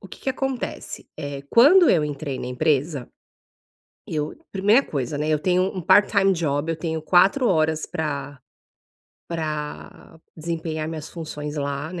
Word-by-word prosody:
o 195 - -12
que - - -12
que 265 - -1
acontece, 265 -1 -4
eh, 140 -1 -5
quando 320 +9 +7
eu 155 -4 +3
entrei 145 -2 -4
na - - -5
empresa, 140 +1 0 1.0
eu 150 -1 -3 0.2
primeira 205 +7 +4
coisa, 140 0 -3
né, 150 +1 -1
eu 155 -1 +2
tenho 180 +3 +2
um 190 -2 -3
part-time 200 +1 +4
job, 155 -2 -1
eu 165 - -4
tenho 160 -1 -3
4 190 - +4
horas 155 -2 +1
pra 145 -3 -4 0.9
pra 160 +2 -5 0.2
desempenhar 160 -1 -3
minhas 160 -1 -6
funções 150 -3 -6
lá 140 +3 -3
na 180 - -5
160 Hz, 150 wpm, -23 LUFS, 150-185 Hz, 1.0 s, quando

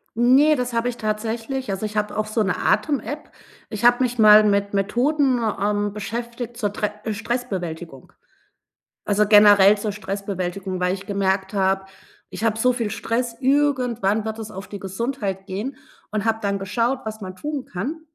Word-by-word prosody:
Ne, 265 +6 +5
das 250 -2 -3
habe 230 +1 0
ich 240 - -6
tatsächlich. 225 +3 -3
Also, 195 +2 -3
ich 215 0 -6
habe 210 0 -1
auch 215 - 0
so 215 +1 -1
'ne 190 - 0
Atem 290 -3 +1
App. 300 +1 -7 0.4
Ich 215 0 -3
habe 245 +1 +5
mich 245 -1 -1
mal 215 -1 +8
mit 200 -1 +1
Methoden, 255 +7 +1 0.2
ähm, 205 0 0
beschäftigt 235 +3 -5
zur 205 -4 -2
tre 210 0 -1 0.2
Stressbewältigung. 185 - -5 0.9
Also, 210 0 +2
generell 205 -1 +7
zur 210 0 -3
Stressbewältigung, 195 -2 -4
weil 180 0 +1
ich 195 0 -9
gemerkt 195 -1 0
habe, 195 0 +1 0.5
ich - - -7
habe 220 -1 +1
so 250 +2 +3
viel 230 -4 -2
Stress, 230 +2 -2
irgendwann 250 -7 +1
wird 220 0 -4
es 220 -1 -7
auf 195 +2 -8
die 205 - -8
Gesundheit 195 -1 -3
gehen 210 +8 -4 0.3
und 215 -1 -2
habe 225 -1 +1
dann 200 -1 0
geschaut, 230 +7 -1
was 220 0 -6
man 185 -2 -7
tun 295 +4 -4
kann. 260 - -4
215 Hz, 170 wpm, -22 LUFS, 200-240 Hz, 0.9 s, mal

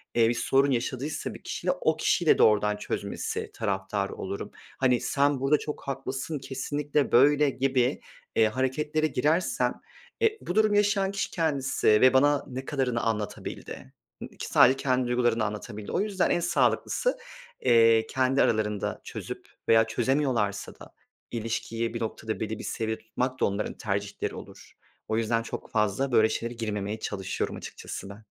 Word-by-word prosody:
eee, 115 -1 +5
bir 120 - +2
sorun 135 +3 +2
yaşadıysa 130 +4 -2
bir - - -12
kişiyle - - -2
o - - +2
kişiyle - - +3
doğrudan 105 -1 +4
çözmesi - - -4
taraftarı 100 0 -2
olurum. 100 +1 -5 0.3
Hani, 125 -2 +3
"Sen 140 -1 +1
burada 135 +3 +3
çok 150 - -5
haklısın, 135 +2 -3
kesinlikle 145 +2 -2
böyle," 145 +3 +5
gibi, 130 -1 +1 0.3
eee, 110 - +5
hareketlere 150 +6 0
girersem, 155 +6 +1 0.5
eee, 445 -1 +3
bu 175 - -4
durumu 215 -1 +4
yaşayan 200 -1 +2
kişi 195 - -3
kendisi 145 -6 0
ve 110 +4 +6
bana 145 +2 +4
ne 130 +1 -6
kadarını 130 -5 -1
anlatabildi? 105 -10 -4 0.3
Ik - - -8
sadece 130 +2 +5
kendi 130 -2 +1
duygularını 120 -2 +1
anlatabildi. 105 0 -6
O - - 0
yüzden 200 -3 0
en - - +2
sağlıklısı, - - +1 0.4
eee, 115 -1 +5
kendi 130 +1 +2
aralarında 105 -2 0
çözüp - - -7 0.2
veya 115 0 +7
çözemiyorlarsa 120 -4 0
da - - -13 0.4
ilişkiyi 115 0 -3
bir 115 - -4
noktada 110 -1 -4
belli 110 0 -3
bir - - -7
seviyede 110 0 -3
tutmak 125 +3 -3
da - - +3
onların 100 +2 -2
tercihleri 100 -1 -3
olur. - - -12 0.3
O 110 - 0
yüzden 115 0 +1
çok - - -7
fazla 105 +6 +1
böyle 110 -2 +5
şeylere 115 +2 -3
girmemeye 105 -2 -3
çalışıyorum 95 -3 -3
açıkçası 95 - -7
ben. 105 +2 -12
125 Hz, 150 wpm, -27 LUFS, 110-140 Hz, 0.5 s, veya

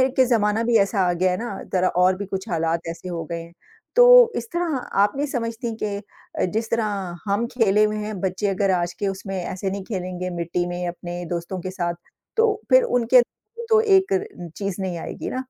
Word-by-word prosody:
के 260 - +5
ज़माना 225 -2 +2
भी 235 -1 +4
ऐसा 195 +1 +1
आ 175 - +2
गया 185 +1 +1
है 180 - -1
ना, 225 -4 -5 0.2
ज़रा 185 0 +3 0.2
और 185 0 +4
भी 205 - -4
कुछ 195 +2 -5
हालात 165 0 -1
ऐसे 175 +2 -7
हो 165 -2 -3
गए 170 0 -3
हैं। 170 +1 -13 0.4
तो - - +8
इस - - -3
तरह 340 -5 -1 0.2
आप 205 +5 +2
नहीं 285 - 0
समझती 230 -2 -3
के 200 -2 -4
जिस 225 +1 -2
तरह 230 -1 +1 0.4
हम 205 +3 0
खेले 215 -3 +3
हुए 215 0 +1
हैं 210 -2 -4
बच्चे 190 +2 -1
अगर 195 0 +1
आज 175 0 -2
के 200 - 0
उसमें 195 0 -4
ऐसे 190 +2 -3
नहीं 195 0 -4
खेलेंगे 185 -3 -4
मिट्टी 170 +1 -1
में, 175 0 -3
अपने 175 0 -6
दोस्तों 175 +2 -4
के 185 +1 -5
साथ 175 -2 -2 0.4
तो 450 -1 +4 0.2
फिर - - +6
उनके 245 - +4 0.5
तो 440 -1 +6
एक 390 -2 +4
रे 380 - -3
चीज़ 195 -1 -3
नहीं 180 -2 -3
आएगी - - -5
ना? 260 +1 -3
200 Hz, 210 wpm, -23 LUFS, 180-235 Hz, 0.5 s, तो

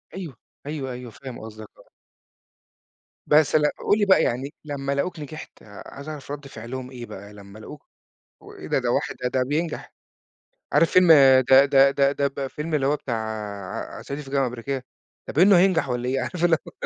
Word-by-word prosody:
أيوه، 170 -10 -7 0.3
أيوه، 140 -3 -4
أيوه، 125 -1 -8
فاهم 130 +1 -10
قصدك، 110 -1 -10
آه. - - -20 1.4
بس 150 0 +4
ل 150 -1 +4
قُل 205 +7 +1
لي 210 - +2
بقى 195 - +5
يعني 130 +5 -2
لمّا 140 -2 -4
لقوك 155 +5 -2
نجحت، 155 +1 -10
عايز 135 +8 -11
أعرف 145 -3 -8
رد 145 -1 -7
فعلهم 125 +1 -8
إيه؟ 120 -2 -8
بقى 100 -1 -11
لمّا 100 0 -13
لقوك 145 +7 -12 0.5
وإيه - - -11
ده! - - +1
ده - - -1
واحد - - -1 0.2
ده 130 - +2
بينجح، 155 +6 -3 0.8
عارف 165 - +4
فيلم 185 -1 +5 0.4
ده 135 +1 +8
ده 140 -1 +5
ده 140 0 +2
ده 140 0 0
ب 140 - -16
الفيلم 150 +4 -4
اللي 140 -3 +1
هو 145 +2 +2
بتاع 110 -6 -5
صعيدي 140 +2 -6
في 135 - -13
الجامعة 135 -1 +1
الأمريكية؟ 125 +2 -5 0.4
ده - - -4
باينه 190 +5 +6
هينجح 180 -5 +3
والّا 125 0 -2
إيه، 135 +1 0
عارف 175 +5 -3
اللي 170 -2 +4
هو - - -9
140 Hz, 185 wpm, -24 LUFS, 125-150 Hz, 1.4 s, ده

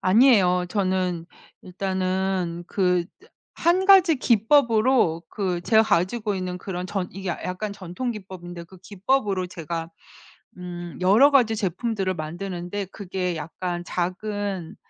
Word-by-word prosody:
아니에요. 185 -4 +4
저는 185 -3 -1 0.4
일단은 185 -2 -2
그 180 -3 +1 0.2
으 - - -18 0.3
1 360 +3 +2
가지 370 -5 +7
기법으로 230 - +3
그 180 -4 -2
제가 220 +2 +5
가지고 210 +3 0
있는 185 -1 -4
그런 180 -1 -5
전 195 -2 -3
이게 190 0 -5
야 - - -4
약간 200 +3 -4
전통 200 +6 -5
기법인데 180 -5 -8
그 185 +3 -16
기법으로 200 -1 0
제가 165 -1 -5 0.7
음 175 -1 -7
여러 215 +11 +6
가지 240 -5 +4
제품들을 195 0 -1
만드는데 175 +4 -5
그게 180 -3 -3
약간 175 +3 -4
작은 190 0 -3
185 Hz, 260 characters per minute, -24 LUFS, 180-215 Hz, 0.7 s, 가지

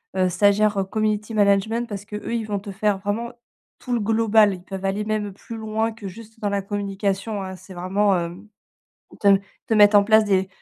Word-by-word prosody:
heu, 185 -1 +2
stagiaire, 200 +2 +2
community 215 0 -1
management», 215 +3 +2
parce 205 -1 -6
qu'eux 210 +2 -6
ils 230 - -1
vont 205 -2 -2
te 200 +1 -10
faire 205 0 0
vraiment 210 +4 -3 0.5
tout 250 - -8
le 240 - +1
global. 220 -1 +3
Ils 180 -1 -9
peuvent 190 +1 -6
aller 195 +2 -1
même 210 -2 -2
plus 225 +3 -9
loin 220 +1 -1
que 220 -2 -9
juste 225 +4 -12
dans 205 - -1
la 200 0 -1
communication 200 +1 -3
hein, 190 0 -6
c'est 185 +1 -13
vraiment, 190 +3 +1
hem, 175 +4 -4 0.7
te 200 - +3 0.4
te 230 - +1
mettre 205 0 +6
en 200 - +6
place 220 +1 +5
des, 190 -2 +1
205 Hz, 200 wpm, -23 LUFS, 195-215 Hz, 0.7 s, mettre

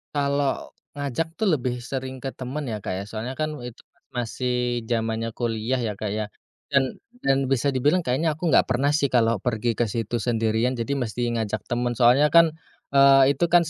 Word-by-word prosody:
Kalo 140 -1 0 0.2
ngajak 145 +4 -3
tuh 220 - 0
lebih 125 -3 -1
sering 130 0 -4
ke 135 +1 -5
temen 135 +4 -5
ya 110 -4 -4
Kak 95 - -3
ya, 95 - -4
soalnya 110 +5 -6
kan 155 0 -1
itu 120 -1 -9
pas - - -38
masih 125 0 -1
jamannya 115 -1 -1
kuliah 115 +1 -1
ya 115 -4 -2
Kak 105 +1 -4
ya, 110 +1 -2 0.5
dan 135 -1 +2 0.2
dan 135 0 +2
bisa 135 +1 +1
dibilang 145 +7 +2
kayaknya 155 +3 0
aku 160 +2 -2
nggak - - +5
pernah 135 +4 +1
sih 145 -1 +2
kalo 115 -4 +2
pergi 115 +1 -1
ke 120 - +2
situ 115 +2 -2
sendirian 115 +1 0
jadi 130 +4 -2
mesti 120 -1 -2
ngajak 110 -1 -2
temen 120 0 0
soalnya 125 +5 +5
kan 170 -1 +7 0.4
eee, 140 0 +6
itu 175 - +3
kan 175 - +8
itu 165 - -3
125 Hz, 195 wpm, -24 LUFS, 115-140 Hz, 0.5 s, kan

